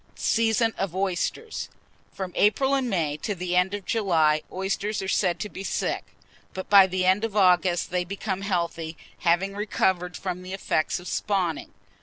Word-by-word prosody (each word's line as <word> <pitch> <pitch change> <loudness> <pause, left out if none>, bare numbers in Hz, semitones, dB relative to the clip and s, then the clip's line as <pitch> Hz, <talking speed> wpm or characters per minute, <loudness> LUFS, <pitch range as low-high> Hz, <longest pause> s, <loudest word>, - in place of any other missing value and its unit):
SEASON 225 0 +2
OF 190 -3 -2
OYSTERS. 195 - -2 0.4
From 185 -2 -6
April 265 +6 +3
and 265 -3 +1
May 160 -7 0
to 205 +6 -3
the 180 0 -2
end 180 +2 +2
of 200 -2 -7
July, 160 -8 +2
oysters 195 +2 -2
are - - -4
said 180 -3 +1
to 210 - -2
be 195 - -8
sick; - - -1 0.5
but 190 - -5
by 195 -2 +9
the 185 0 -1
end 190 +3 +3
of 220 -2 -2
August 180 -3 +3
they 180 0 +1
become 195 +1 -4
healthy, 170 -4 -2 0.2
having 175 +4 +2
recovered 190 -3 0
from 180 -1 -4
the 185 +1 -7
effects 170 -5 0
of 180 - -10
spawning. 185 -7 -1
190 Hz, 170 wpm, -25 LUFS, 175-205 Hz, 0.5 s, by